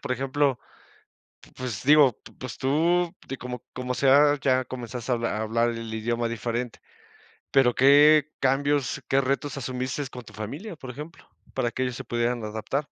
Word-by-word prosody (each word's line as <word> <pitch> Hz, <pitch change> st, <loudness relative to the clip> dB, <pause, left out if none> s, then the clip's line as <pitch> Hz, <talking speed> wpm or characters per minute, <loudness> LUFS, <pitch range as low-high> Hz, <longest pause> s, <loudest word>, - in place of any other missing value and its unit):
por 135 Hz, -3 st, -2 dB
ejemplo? 135 Hz, +1 st, 0 dB, 0.8 s
P -, -, -18 dB
pues 125 Hz, -4 st, -5 dB
digo, 145 Hz, -3 st, +6 dB
p -, -, -13 dB
pues 130 Hz, -2 st, -7 dB
tú, 170 Hz, +6 st, +1 dB
de 135 Hz, -, -5 dB
como 125 Hz, -1 st, -7 dB
como 125 Hz, 0 st, -3 dB
sea, 145 Hz, +2 st, +5 dB
ya 130 Hz, -1 st, +2 dB
comenzaste 125 Hz, 0 st, -6 dB
a -, -, +2 dB
a 115 Hz, -2 st, -2 dB
hablar 115 Hz, +2 st, +1 dB
el 115 Hz, -1 st, -5 dB
idioma 115 Hz, +1 st, -1 dB
diferente, 115 Hz, +1 st, -3 dB, 0.7 s
pero 135 Hz, -3 st, +4 dB
¿qué 145 Hz, +2 st, +6 dB
cambios 140 Hz, +1 st, +1 dB
qué 135 Hz, -, +3 dB
retos 140 Hz, +1 st, -2 dB
asumiste 130 Hz, +1 st, -3 dB
con 125 Hz, -, -8 dB
tu 105 Hz, -, -14 dB
familia, 145 Hz, -, -7 dB
por 130 Hz, -3 st, -9 dB
ejemplo, 150 Hz, +6 st, -10 dB, 0.3 s
para 120 Hz, -, 0 dB
que 130 Hz, -, -4 dB
ellos 125 Hz, -1 st, -3 dB
se 130 Hz, -, -7 dB
pudieran 120 Hz, 0 st, -1 dB
adaptar? 110 Hz, +5 st, -3 dB
130 Hz, 170 wpm, -26 LUFS, 120-140 Hz, 0.8 s, digo